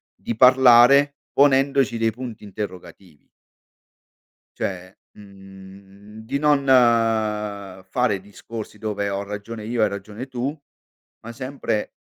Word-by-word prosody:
di 115 - -5
parlare 130 +2 +6 0.2
ponendoci 135 -3 +3
dei 115 0 +1
punti 115 -2 -9
interrogativi. 90 -5 -9 1.3
Cioè, 95 0 -5 0.2
mhmm, 100 +1 -15
di 140 +5 -2
non 145 -2 +2
fare 110 -4 +1
discorsi 105 +2 -10
dove 100 -2 -3
"ho 100 0 -3
ragione 105 +2 -7
io, 115 0 0
hai - - +4
ragione 105 +4 -7
tu", 130 0 -3 0.7
ma 115 - -8
sempre 130 -3 -4
110 Hz, 105 wpm, -22 LUFS, 100-125 Hz, 1.3 s, parlare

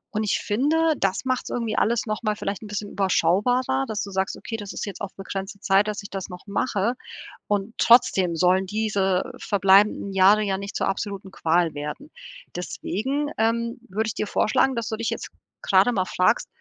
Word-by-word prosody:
Und 215 - +1
ich 205 - +1
finde, 310 +9 +2
das 195 +3 -1
macht's 255 -1 -1
irgendwie 230 -3 -2
alles 235 +1 +1
nochmal 215 0 -1
vielleicht 200 0 -4
'nen 215 - -8
bisschen 205 0 -5
überschaubarer, 195 - +1
dass 215 -1 -3
du 200 - -7
sagst: 190 0 -1
„Okay, 225 - -6
das 205 -2 -7
ist - - -4
jetzt 200 0 -8
auf 200 -2 -5
begrenzte 195 +1 -6
Zeit, 195 +2 +3
dass 210 -1 -3
ich 200 - -9
das 195 -1 -5
noch 180 0 -10
mache,“ 210 +1 0 0.5
und 205 +2 -1
trotzdem 190 -7 +4
sollen 180 +3 +3
diese 200 0 0
verbleibenden 200 0 +3
Jahre 195 +3 +5
ja 195 -2 -1
nicht 200 +2 -7
zur - - 0
absoluten 195 -1 -4
Qual 165 -2 +1
werden. 150 - -6 0.4
Deswegen, 265 +10 -3
ähm, 230 +2 0
würde 215 +4 -1
ich 220 - -2
dir 210 - -2
vorschlagen, 255 +6 +2
dass 230 -2 -3
du 220 - -2
dich 230 0 -2
jetzt - - -5 0.3
grade - - +4
mal 190 -5 0
fragst: 185 +6 +1
205 Hz, 190 wpm, -24 LUFS, 190-225 Hz, 0.5 s, Jahre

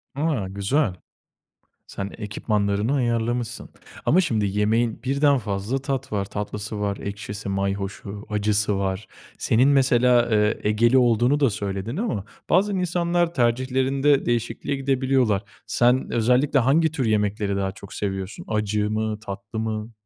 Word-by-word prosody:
A, 140 -10 0
güzel. 100 +4 0 0.9
Sen 100 0 -5
ekipmanlarını 105 +2 -1
ayarlamışsın 120 -1 -1 0.4
ama 185 +5 +5
şimdi 110 - 0
yemeğin 110 +4 0
birden 140 +1 +3
fazla 105 +4 -2
tat 135 -2 -3
var, 100 -2 -1
tatlısı 105 +1 -5
var, 100 -1 -1
ekşisi, 100 0 -6
mayhoşu, 100 +1 -3
acısı 105 -1 +1
var. 95 +1 -2 0.3
Senin 125 +5 +3
mesela, 125 -3 +4
eee, 105 0 +2
Egeli 115 +5 +3
olduğunu 120 +3 +3
da 135 -4 +4
söyledin 100 - -4
ama 200 - -2 0.2
bazen 195 +3 +3
insanlar 175 -1 0
tercihlerinde 130 +3 +2
değişikliğe 120 +4 -1
gidebiliyorlar. 130 -6 +1 0.2
Sen 125 +2 +2
özellikle 125 +5 +3
hangi 155 +6 +3
tür 135 -6 -2
yemekleri 105 -2 0
daha 95 -1 -1
çok 100 0 -12
seviyorsun? 95 0 -4
Acı 105 -1 0
mı, 110 0 -1
tatlı 110 +1 -6
mı? 110 0 -3
110 Hz, 130 wpm, -24 LUFS, 105-130 Hz, 0.9 s, ama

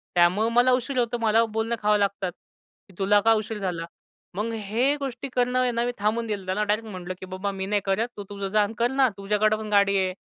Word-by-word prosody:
त्यामुळं 180 +6 +4
मला 245 +2 +4
उशीर 255 +2 -1
होतो. 240 0 0
मला 225 0 +3
बोलणं 225 +1 -2
खावं 210 0 +3
लागतात, 200 -2 -1 0.6
की 195 - -18
'तुला 205 +1 +4
का 225 +1 +5
उशीर 215 0 -6
झाला?'" 175 -4 -3 0.5
मग 215 +3 -2
हे 225 +6 0
गोष्टी 275 -1 -5
करणं 250 0 +1
आहे 250 -1 +2
ना 235 0 0
मी 245 - 0
थांबून 225 +3 0
दिलं. 205 -3 -4
त्याला 190 +3 0
डायरेक्ट 215 +2 -1
म्हटलं 185 -2 -6
की - - -7
"बाबा 185 +2 -4
मी 190 -1 -4
नाही 205 +1 0
करत. 195 +4 +1
तू 205 - -5
तुझं 200 -1 -4
जा 210 +1 +3
अन् 205 - -3
कर 240 +2 +1
ना. 265 -1 +3
तुझ्याकडं 210 +2 +1
पण 215 -1 -6
गाडी 200 -1 +4
आहे. 185 -1 0
210 Hz, 235 wpm, -25 LUFS, 195-235 Hz, 0.6 s, का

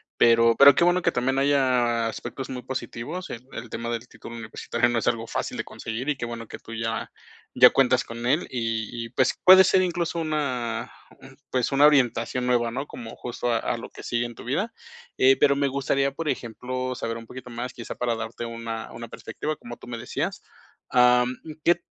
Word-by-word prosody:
pero 115 0 +5
pero 140 0 +9
qué 170 - +3
bueno 175 +1 +3
que - - +2
también 130 +2 0
haya 125 -4 +2
aspectos 120 +4 -6
muy 125 -1 -5
positivos, 130 +8 -5
el 120 +1 -7
el 115 -1 -7
tema 115 +1 -4
del 120 +1 -4
título 115 -1 -10
universitario 115 +2 -1
no 120 -1 +1
es - - -4
algo 115 -1 0
fácil - - -3
de - - -3
conseguir 115 +4 -6
y 150 - +1
qué 120 - -4
bueno 115 -1 -6
que - - -9
tú 115 - -11
ya 115 0 -3 0.4
ya - - +8
cuentas 130 -1 +3
con 115 +1 -7
él 145 +8 +1
y 115 -3 -2 0.2
y, 115 - -10
pues, 130 +2 +1
puede 190 +1 +9
ser 185 - +4
incluso 170 -1 -1
una, 140 -7 -2 0.6
pues, 125 0 0
una 140 +2 +6
orientación 125 -3 +2
nueva 120 -2 +2
¿no? 135 +4 -4
Como, 115 -2 -9
justo, 120 0 -3
a 115 - +2
a 120 - -2
lo - - -8
que - - -12
sigue 120 0 -1
en 120 -1 -7
tu - - -11
vida, 185 - -1 0.4
eh, 130 +1 +6
pero 140 -1 +4
me 140 0 +2
gustaría, 140 0 0
por 160 +2 -3
ejemplo, 130 +2 -3
saber 115 -2 -3
un 115 - -10
poquito 125 -1 -10
más, 120 +2 -5
quizá 120 - -7
para 120 -2 -1
darte 115 +1 -5
una 115 -1 -6
una 115 0 -8
perspectiva, 150 +6 -5
como 120 0 -9
tú - - -14
me 120 - -5
decías, 145 - -3 0.5
am, 125 0 +4 0.3
¿qué? 175 0 +3
125 Hz, 210 wpm, -25 LUFS, 115-140 Hz, 0.6 s, pero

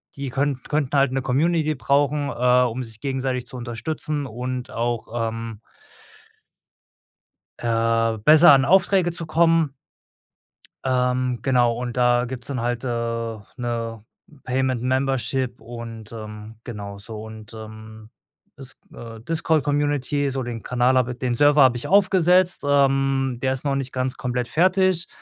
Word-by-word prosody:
die 140 -1 -4
können 135 0 -1
könnten 145 -2 0
halt 135 -1 +3
'ne 135 - -1
Community 155 +4 +1
brauchen, 140 +3 +1
äh, 125 0 +3
um 125 +1 -2
sich 115 -2 -12
gegenseitig 130 -2 -2
zu 125 - -9
unterstützen 140 +5 -4
und 125 +1 -5
auch, 120 0 -2 0.2
ähm 115 -1 -7 2.0
Äh, 115 -1 +1
besser 155 +6 +7
an 135 -1 +5
Aufträge 185 +2 +3
zu 165 0 -6
kommen 165 -2 +2 1.1
ähm, 125 -1 0
genau 125 -3 +2
und 125 0 -5
da 120 0 +3
gibt's 125 -1 -7
dann 130 -4 -3
halt, 120 0 -2
äh, 115 -2 -2 0.2
'ne 115 -2 -4 0.4
Payment-Membership 130 0 -1
und, 115 -2 -9
ähm, 110 0 -9
genau 100 -3 -7
so 110 +1 -8
und, 110 0 -11
ähm, 110 0 -11 0.5
is 130 -1 -12 0.2
äh, 115 -1 -9
Discord-Community, 145 -1 0
so 135 -1 -3
den 120 -2 -6
Kanal 125 +1 +2
habe 125 -1 +1
i 120 - -8
den 125 -2 -1
Server 145 +2 +5
habe 125 -2 +4
ich 120 - -5
aufgesetzt, 185 -2 +4
ähm, 135 -2 +2
der 130 0 +1
ist 135 +2 -6
noch 140 -1 +1
nicht 135 -1 -3
ganz 130 0 -2
komplett 125 -1 -2
fertig. 185 0 +2
125 Hz, 140 wpm, -23 LUFS, 115-140 Hz, 2.0 s, besser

